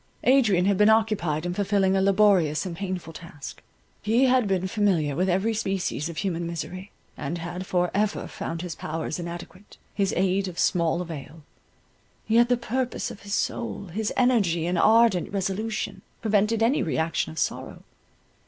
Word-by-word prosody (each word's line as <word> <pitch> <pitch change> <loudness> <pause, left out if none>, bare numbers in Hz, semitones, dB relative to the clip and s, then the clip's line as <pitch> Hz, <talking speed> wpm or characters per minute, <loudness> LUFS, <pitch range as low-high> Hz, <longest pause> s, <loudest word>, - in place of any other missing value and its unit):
Adrian 230 -9 +4
had 200 -1 +2
been 210 +1 +6
occupied 210 -8 +1
in 175 - -2
fulfilling 195 0 +1
a 190 - +2
laborious 190 -6 +3
and 175 -3 -5
painful 185 -3 -5
task. 155 -4 -10 0.4
He 225 +5 +2
had 255 -3 +3
been 190 -2 0
familiar 185 -8 +1
with 185 +4 +1
every 190 +5 +1
species 190 -7 -2
of 165 - -8
human 170 -2 -2
misery, 185 +3 -6 0.3
and 150 +4 -4
had 175 +2 -6
for 180 -1 +1
ever 210 +1 0
found 165 +1 -5
his 175 -2 -4
powers 160 +1 -4
inadequate, 175 +3 -9 0.2
his 195 -2 0
aid 190 +1 +1
of 175 -2 -8
small 170 0 +1
avail. 160 -1 -9 0.8
Yet 235 +2 +4
the 245 - +3
purpose 250 +2 -2
of - - -11
his 200 0 -3
soul, 200 -5 -3
his 215 +1 -1
energy 200 -10 +2
and 175 0 0
ardent 220 -4 +4
resolution, 200 +3 -3 0.2
prevented 215 +1 +2
any 245 +6 +2
re 160 - -1
action 160 - -1
of 80 - -12
sorrow. - - -3
190 Hz, 165 wpm, -25 LUFS, 170-215 Hz, 0.8 s, been